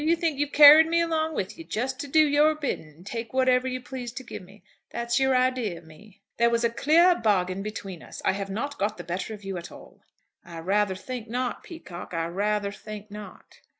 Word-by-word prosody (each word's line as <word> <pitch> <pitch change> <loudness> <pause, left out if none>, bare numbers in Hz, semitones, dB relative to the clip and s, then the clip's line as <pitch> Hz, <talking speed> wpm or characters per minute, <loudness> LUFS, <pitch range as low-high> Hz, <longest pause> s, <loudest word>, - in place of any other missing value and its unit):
You 325 +2 +3
think 325 -4 -2
you've 290 0 -1
carried 300 +2 +9
me 335 +1 +2
along 320 -2 0
with 200 - -4
you, - - -7
just 260 -1 -3
to 285 - -5
do 310 +2 +5
your 300 +2 +3
bidding 285 - -4
and 160 +4 -18
take 230 +2 -6
whatever 255 -1 +2
you 255 0 -3
please 250 -1 -7
to 260 - -7
give 250 - -8
me? 195 +3 -17 0.3
That's 235 +1 -1
your 265 -1 +2
idea 255 -7 0
of 165 - -14
me?" 185 +6 -18
"There 235 0 +4
was 235 0 0
a 235 - +2
clear 330 +9 +4
bargain 195 - 0
between 195 -4 -7
us. - - -11
I - - +4
have 195 0 -4
not 280 +9 -4
got 210 +1 -1
the 175 - -7
better 185 +6 -4
of 205 - -16
you 195 -1 -4
at 170 - -8
all." - - -15 0.4
"I 170 -1 -10
rather 195 +3 0
think 240 +3 -7
not, 250 +1 -2
Peacocke. 180 - -9
I 165 0 -1
rather 200 +3 -1
think 210 0 -10
not. 210 0 -11
235 Hz, 225 wpm, -26 LUFS, 195-280 Hz, 0.4 s, carried